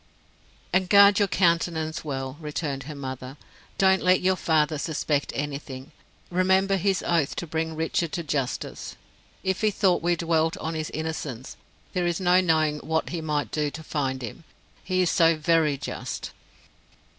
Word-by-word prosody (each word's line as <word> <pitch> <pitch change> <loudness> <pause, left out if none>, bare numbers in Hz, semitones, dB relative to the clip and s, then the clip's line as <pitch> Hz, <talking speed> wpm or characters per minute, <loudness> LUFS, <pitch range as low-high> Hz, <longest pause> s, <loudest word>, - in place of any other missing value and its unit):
"And 185 -1 +2
guard 200 0 +7
your 205 - +3
countenance 165 -3 +1
well," 135 -3 -4
returned 145 -3 -4
her 150 +1 -7
mother. 130 0 -7 0.4
"Don't 190 0 +4
let 185 0 +4
your 185 +1 +2
father 155 -3 +1
suspect 150 -2 -1
anything. 140 -1 -5 0.4
Remember 190 +2 +3
his 190 0 0
oath 165 -5 +1
to - - -4
bring 160 0 -3
Richard 160 +1 -1
to 170 - -2
justice. 140 -4 -3 0.5
If 190 +1 -1
he 215 - +4
thought 190 -3 +2
we 175 +1 +2
dwelt 165 -1 +1
on 160 +1 -4
his 155 -1 -3
innocence, 155 -5 -5 0.4
there 180 -1 0
is 170 -1 -1
no 180 0 +4
knowing 155 -4 +2
what 160 +1 -1
he 170 -2 -3
might 150 -6 -2
do 150 -1 0
to 160 +2 -9
find 135 -4 -2
him, 115 +7 -7 0.4
he 185 -1 +1
is 175 - +1
so 165 -2 +4
very 155 -2 +2
just." - - -5
160 Hz, 160 wpm, -25 LUFS, 150-180 Hz, 0.5 s, guard